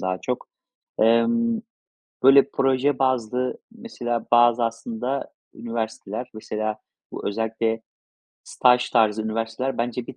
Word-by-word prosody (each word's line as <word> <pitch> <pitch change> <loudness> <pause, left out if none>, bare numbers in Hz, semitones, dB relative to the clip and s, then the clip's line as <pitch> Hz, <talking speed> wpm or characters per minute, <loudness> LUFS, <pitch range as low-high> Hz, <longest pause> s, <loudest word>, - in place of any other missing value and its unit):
daha 95 -1 -2
çok. 125 -1 -3 0.5
Emm, 225 - +3 0.6
böyle 135 +1 +7
proje 135 +1 +1
bazlı, 125 -1 0
mesela 125 - -4
bazı 120 0 +5
aslında 115 +3 -3 0.2
üniversiteler 115 0 -5
mesela 110 0 -3 0.4
bu - - -4
özellikle 110 +1 -1 0.6
staj 125 0 +3
tarzı 110 -2 +3
üniversiteler 115 +4 -3
bence 120 0 -2
bir - - -9
120 Hz, 105 wpm, -23 LUFS, 110-130 Hz, 0.6 s, böyle